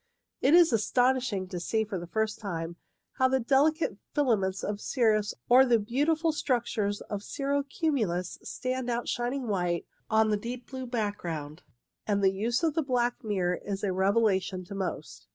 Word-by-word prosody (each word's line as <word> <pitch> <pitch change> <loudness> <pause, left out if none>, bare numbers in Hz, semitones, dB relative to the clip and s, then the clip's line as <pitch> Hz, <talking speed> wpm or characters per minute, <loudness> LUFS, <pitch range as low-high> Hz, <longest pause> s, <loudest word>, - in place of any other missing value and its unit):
It 285 +5 +5
is 345 -6 +6
astonishing 245 -3 +1
to 180 - -4
see 220 +5 0
for 205 -3 -4
the 170 - -8
first 220 +5 -1
time 170 -5 -4 0.4
how 260 - +5
the 265 0 +2
delicate 275 - +2 0.2
filaments 205 -9 +1
of 205 0 -3
cirrus 215 -5 +1
or 255 +2 +7
the 245 -3 +4
beautiful 295 +9 +1
structures 235 -8 -1
of 205 -1 -5
cirro 280 +5 -1
cumulus 250 - -1
stand 255 -1 -3
out 240 0 -1
shining 245 +1 -2
white 175 -4 0 0.2
on 220 0 +3
the 210 - +2
deep 240 +3 -6
blue 260 -1 -5
background; 180 -9 -3 0.5
and 200 -1 +1
the 190 0 +4
use 230 - -1
of 320 -2 +2
the 325 - +1
black 250 -1 0
mirror 185 -5 0
is 200 0 -4
a 195 -2 0
revelation 190 -1 +1
to 190 - -9
most. 185 - -5
220 Hz, 170 wpm, -29 LUFS, 195-260 Hz, 0.5 s, or